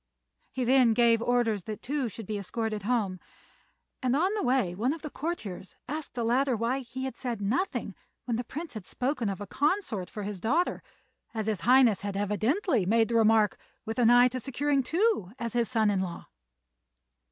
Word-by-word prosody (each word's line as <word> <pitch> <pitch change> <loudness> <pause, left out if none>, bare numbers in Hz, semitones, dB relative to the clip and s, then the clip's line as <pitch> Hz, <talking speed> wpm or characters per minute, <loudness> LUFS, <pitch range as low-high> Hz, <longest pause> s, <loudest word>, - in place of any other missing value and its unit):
He 255 - -2
then 250 -2 +4
gave 230 -1 +4
orders 235 -5 +1
that 215 -1 -6
Tou 275 -2 -1
should 220 +1 -8
be 210 +1 -3
escorted 215 +1 -3
home; 205 -4 0 0.8
and 255 -1 +1
on 365 +7 +2
the 425 - -1
way 245 -8 +1
one 235 +9 0
of 325 - -9
the 305 - -5
courtiers 225 - -5
asked 300 +2 -5
the 240 - -1
latter 250 +3 +2
why 235 +4 0
he 260 +1 -6
had 265 - -5
said 240 -4 -4
nothing 225 - -1 0.3
when 240 - -1
the 240 - -2
Prince 310 +6 -7
had 215 -5 -8
spoken 250 -4 -1
of 195 - -4
a 205 - -5
consort 285 - -1
for 210 - -6
his 200 -1 -5
daughter, 310 - +1 0.5
as 220 -1 -2
his 215 -4 -1
Highness 245 -4 +5
had 200 -1 -3
evidently 220 - +1
made 225 +4 +2
the 235 - -1
remark 220 -1 +4 0.3
with 225 +2 -3
an 235 -2 +5
eye 245 +1 +7
to 255 +1 -4
securing 275 +3 0
Tou 320 - 0
as 235 -3 -4
his 235 -2 +1
son 220 -4 +2
in 195 - 0
law. 175 -2 -5
235 Hz, 195 wpm, -28 LUFS, 215-265 Hz, 0.8 s, eye